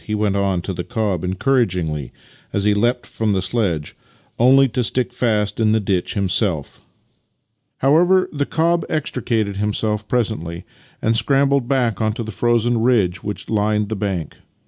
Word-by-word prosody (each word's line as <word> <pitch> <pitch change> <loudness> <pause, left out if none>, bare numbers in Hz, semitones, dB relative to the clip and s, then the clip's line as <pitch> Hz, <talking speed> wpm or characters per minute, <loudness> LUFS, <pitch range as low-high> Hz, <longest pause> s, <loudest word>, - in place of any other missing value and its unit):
" - - -22
he 105 - -3
went 105 -2 0
on 95 -3 0
to 95 - -3
the 90 0 -4
cob 105 -7 -2
encouragingly 90 - 0 0.4
as 100 - -1
he 105 0 +3
leapt 120 +4 0
from 110 -2 -1
the 95 - +1
sledge 90 -9 -1 0.2
— - - -34
only 135 +3 +6
to 125 0 -1
stick 125 +2 -1
fast 105 -4 0
in 110 -1 +3
the 110 - +3
ditch 95 -2 -1
himself. 95 -5 0 1.0
However, 175 +7 +4
the 145 -1 -1
cob 170 +2 +1
extricated 115 -8 -1
himself 105 +1 -1
presently, 100 -8 -2 0.4
and 115 +1 +2
scrambled 140 +1 +2
back 120 -6 0
onto 110 +1 -1
the 110 - -6
frozen 120 +3 +1
ridge 105 -7 +2
which 105 -1 -5
lined 105 -1 0
the 110 - -2
bank. 95 -6 -3
110 Hz, 165 wpm, -20 LUFS, 100-125 Hz, 1.0 s, only